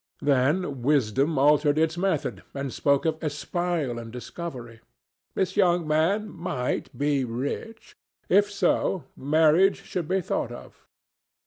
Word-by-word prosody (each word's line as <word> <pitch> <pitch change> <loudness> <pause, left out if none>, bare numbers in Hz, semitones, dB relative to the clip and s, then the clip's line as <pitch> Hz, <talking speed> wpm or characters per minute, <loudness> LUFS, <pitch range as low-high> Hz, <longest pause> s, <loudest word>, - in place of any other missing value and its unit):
Then 140 +1 +1
wisdom 140 +2 +1
altered 145 +1 +4
its 160 +1 +2
method 180 -4 -1
and 140 -2 -4
spoke 140 0 +1
of 160 0 -1
espial 155 -3 -2
and 115 -1 -8
discovery. 125 -2 -7 0.6
This 190 0 -1
young 175 -4 +3
man 165 +8 +1
might 170 -10 -4
be 145 -1 +1
rich. 135 - -5 0.3
If 205 +2 +4
so, 195 -3 +1
marriage 160 +6 +3
should 175 -4 -4
be 190 +2 +1
thought - - -2
of. - - -12
155 Hz, 125 wpm, -26 LUFS, 135-175 Hz, 0.6 s, altered